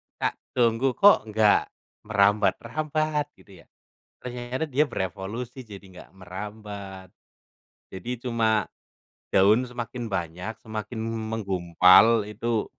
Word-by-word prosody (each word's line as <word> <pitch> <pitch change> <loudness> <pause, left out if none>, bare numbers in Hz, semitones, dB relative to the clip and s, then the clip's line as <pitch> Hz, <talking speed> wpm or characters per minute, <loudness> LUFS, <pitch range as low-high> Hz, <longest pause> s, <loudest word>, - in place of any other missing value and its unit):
tak - - -2 0.2
tunggu, 120 +1 +2
kok 200 - +5
nggak 110 -1 +3 0.4
merambat-rambat 140 +10 +1
gitu 95 -4 -17
ya? - - -32 0.6
Ternyata 125 +4 -4
dia 145 +4 +3
berevolusi 115 +5 -5
jadi 100 -2 -11
nggak 95 -2 -14
merambat. 95 0 -8 0.8
Jadi, 95 +6 -7
cuma 115 -3 +1 0.7
daun 105 +6 +4
semakin 120 0 -6
banyak, 90 +2 -4
semakin 110 +1 -6
m 115 - -3 0.2
menggumpal 95 +2 +5
itu, 110 +2 -2
110 Hz, 105 wpm, -25 LUFS, 95-120 Hz, 0.8 s, kok